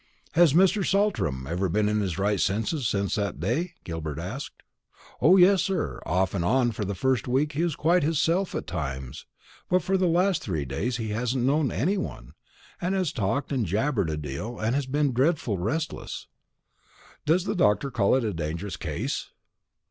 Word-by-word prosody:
"Has 170 -3 +5
Mr. 190 +4 +4
Saltram 190 - +1
never 90 +7 -1
been 105 +4 +1
in 105 0 +1
his 95 -4 -2
right 100 +1 +1
senses 115 +7 0
since 100 -1 0
that 100 -8 -2
day?" 140 - -1
Gilbert 80 -4 -5
asked. 125 - -6 0.6
"O 190 - +6
yes, 190 0 +6
sir; 190 -3 -2
off 95 +1 +1
and 90 -4 -1
on 120 +5 +2
for 105 -1 -4
the 100 0 -3
first 130 +3 0
week 135 +5 +1
he 155 +3 -1
was 170 -4 0
quite 175 +4 +3
hisself 165 +5 +1
at - - -3
times; 65 -7 -5 0.4
but 185 -2 +3
for 190 +3 +1
the 185 -1 +2
last 180 +2 +2
three 80 -8 -2
days 105 - -2
he 110 -2 -4
hasn't 120 +3 -1
known 140 +1 +2
any 190 - 0
one, 65 - -6 0.5
and 185 +2 0
has 185 -5 0
talked 125 +6 -1
and 125 -7 0
jabbered 105 - 0
a 75 - -2
deal, 75 - -5
and 110 +2 0
has 140 -1 -1
been 145 0 +1
dreadful 130 - +1
restless." 155 - -3 1.0
"Does 170 +4 +3
the 205 - -1
doctor 135 - +2
call 100 0 +3
it 130 - +1
a 105 -3 -1
dangerous 85 +4 -4
case?" - - -3
120 Hz, 185 wpm, -26 LUFS, 95-160 Hz, 1.0 s, O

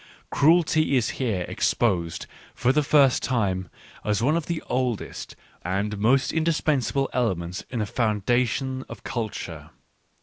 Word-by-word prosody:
Cruelty 155 -2 +3
is 120 - +1
here 100 -8 0
ex - - 0
posed, 90 -8 0 0.3
for 125 - +2
the 150 - +3
first 140 -3 +4
time, 95 -8 -1 0.3
as 105 -1 0
one 135 +7 +2
of 165 -2 -2
the 170 -2 -3
oldest 125 -4 -3 0.3
and 100 +3 -2
most 130 +6 +2
indispensable 150 -4 +1
elements 90 -7 -1
in 125 - -4
the 110 - 0
foundation 120 +4 0
of - - -10
culture. 115 -3 -5
120 Hz, 135 wpm, -25 LUFS, 105-135 Hz, 0.3 s, first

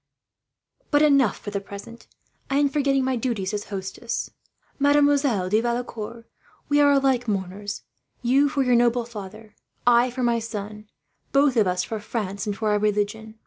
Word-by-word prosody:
"But 290 0 +4
enough, 275 -7 +4
for 205 - -7
the 200 -1 -2
present. 200 +4 -11 0.4
I 275 - +1
am 285 0 +3
forgetting 275 -2 +1
my 260 0 0
duties 225 -5 -2
as 205 0 -3
hostess. 195 +3 -5 0.5
Mademoiselle 285 -7 +3
de 215 +4 +2
Valecourt, 235 -1 -4 0.4
we 290 0 +4
are 285 0 +6
alike 265 -3 +2
mourners 200 0 -4 0.4
you 275 +4 +3
for 275 0 0
your 250 -1 +2
noble 240 0 +3
father, 215 -1 -10 0.3
I 240 +1 +5
for 250 +1 -4
my 235 -1 +2
son, 210 -1 -7 0.4
both 275 -1 +3
of 215 -4 +3
us 180 0 0
for 220 - -4
France 205 -1 -4
and 205 -1 -2
for 215 0 0
our 210 - +2
religion. 210 +1 -1
230 Hz, 165 wpm, -24 LUFS, 205-265 Hz, 0.5 s, are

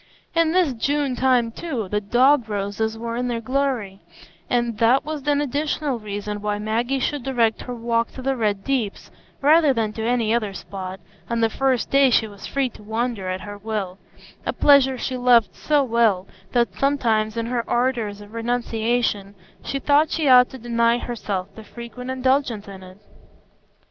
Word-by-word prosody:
In 330 -1 +3
this 350 -6 +2
June 275 +3 0
time, 250 -3 +2
too, 245 - -4
the 210 +2 -1
dog 245 +3 +3
roses 210 +2 -2
were 230 0 -4
in 250 +1 -1
their 235 -1 -2
glory, 245 -5 -2 0.5
and 240 -2 0
that 240 +3 +4
was 300 -2 -5
an 290 0 +3
additional 290 -1 -1
reason 205 0 -5
why 210 0 -1
Maggie 230 +5 -1
should 290 +2 -1
direct 235 -4 +1
her 250 - -6
walk 230 0 0
to 260 - -8
the 270 +1 0
Red 210 -4 -1
Deeps, 250 -7 -2 0.3
rather 305 -1 +5
than 220 -2 -1
to 220 - -5
any 230 -1 +1
other 215 -4 -1
spot, 190 0 -7 0.3
on 235 -1 0
the 225 -1 +2
first 260 -3 0
day 275 -1 +5
she 230 -2 +3
was 200 -2 -10
free 275 -1 0
to 215 - -16
wander 220 -2 -2
at 185 +1 -3
her 205 0 -8
will,—a 200 -3 -6
pleasure 270 -2 +5
she 255 +1 -3
loved 245 -3 +4
so 295 -2 +1
well, 225 -6 +2 0.3
that 240 -1 +1
sometimes, 230 -6 +1
in 230 - -1
her 240 0 -1
ardors 235 -5 0
of 205 +1 -13
renunciation, 230 -3 -1 0.3
she 275 - -3
thought 290 +3 +3
she 315 -3 -1
ought 250 -1 +7
to 265 - -9
deny 235 0 +1
herself 200 -6 -4
the 220 - -11
frequent 240 +3 -9
indulgence 260 -4 0
in 195 -1 -10
it. 185 0 -13
235 Hz, 175 wpm, -22 LUFS, 215-265 Hz, 0.5 s, ought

